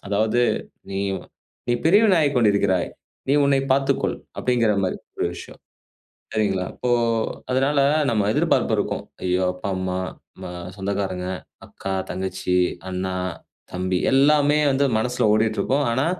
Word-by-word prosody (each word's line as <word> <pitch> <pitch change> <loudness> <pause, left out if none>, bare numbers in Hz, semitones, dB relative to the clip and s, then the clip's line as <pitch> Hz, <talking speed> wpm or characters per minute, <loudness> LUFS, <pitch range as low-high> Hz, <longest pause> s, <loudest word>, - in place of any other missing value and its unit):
அதாவது 110 +4 +1 0.5
நீ 95 - -3 0.7
"நீ - - +3
பெரியவனாகிக் 175 -5 +4
கொண்டிருக்கிறாய். 100 -5 +2 0.4
நீ - - +3
உன்னை 140 -1 +3
பார்த்துக்கொள்" 135 0 +1 0.2
அப்படிங்கிற 120 -3 +2
மாரி 90 - -1 0.2
ஒரு - - +1
விஷயம். - - -10 0.7
சரிங்களா. 95 -4 0
இப்போ 125 - -3 0.6
அதனால 135 +3 +2 0.3
நம்ம 110 -3 +1
எதிர்பார்ப்பு - - +2
இருக்கும். - - -2 0.2
ஐயோ 90 0 +1
அப்பா, 90 +2 -5
அம்மா 95 0 -2 0.4
ம - - -7 0.3
சொந்தக்காரங்க, 95 -2 -3 0.4
அக்கா, 95 - -5 0.2
தங்கச்சி, 90 0 -1 0.3
அண்ணா, 95 0 -3 0.6
தம்பி 90 0 -1
எல்லாமே 145 +2 +4
வந்து 135 +1 +2
மனசுல 125 +3 -1
ஓடிட்டுருக்கும். 110 +6 +1
ஆனா, 130 +4 +1
110 Hz, 120 wpm, -23 LUFS, 95-135 Hz, 0.7 s, பெரியவனாகிக்